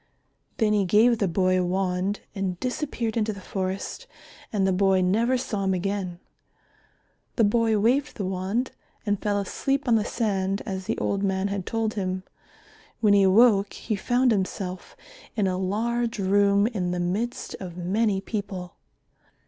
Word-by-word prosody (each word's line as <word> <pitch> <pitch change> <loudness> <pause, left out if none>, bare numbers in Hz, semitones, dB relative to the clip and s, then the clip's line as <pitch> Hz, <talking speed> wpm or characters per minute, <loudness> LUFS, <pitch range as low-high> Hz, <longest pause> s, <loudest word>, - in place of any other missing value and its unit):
Then 220 -3 +2
he 205 -1 +3
gave 220 +5 +4
the 200 - +2
boy 185 +1 +2
a - - +1
wand 185 +2 -1
and 190 -3 -3
disappeared 250 -3 -2
into 215 -1 0
the 200 - -9
forest 190 - -4 0.4
and 200 -3 +1
the 190 - +2
boy 190 0 +3
never 225 +8 +2
saw 215 -5 -3
him 190 -1 +2
again. 185 -1 -3 1.2
The 230 - +3
boy 225 +1 +3
waved 255 +7 +1
the 200 - -2
wand 190 +7 -1 0.3
and 205 -2 0
fell 205 -1 +1
asleep 275 +8 -1
on 240 - +4
the 215 - +1
sand 195 -4 -1
as 190 -2 -4
the - - -2
old 200 - -1
man 190 0 0
had 200 -2 -4
told 225 -1 -1
him. 185 -2 -2 0.8
When 210 -3 +4
he 200 - +6
awoke 200 +1 +5
he 220 - -3
found 245 +5 +2
himself 190 -2 -3 0.4
in 210 - +1
a 185 -1 0
large 230 +5 -1
room 200 +1 +3
in 200 -6 -1
the 180 0 -2
midst 205 +8 -2
of 180 -2 -7
many 195 +3 +1
people. 195 -4 -5
200 Hz, 165 wpm, -25 LUFS, 190-225 Hz, 1.2 s, he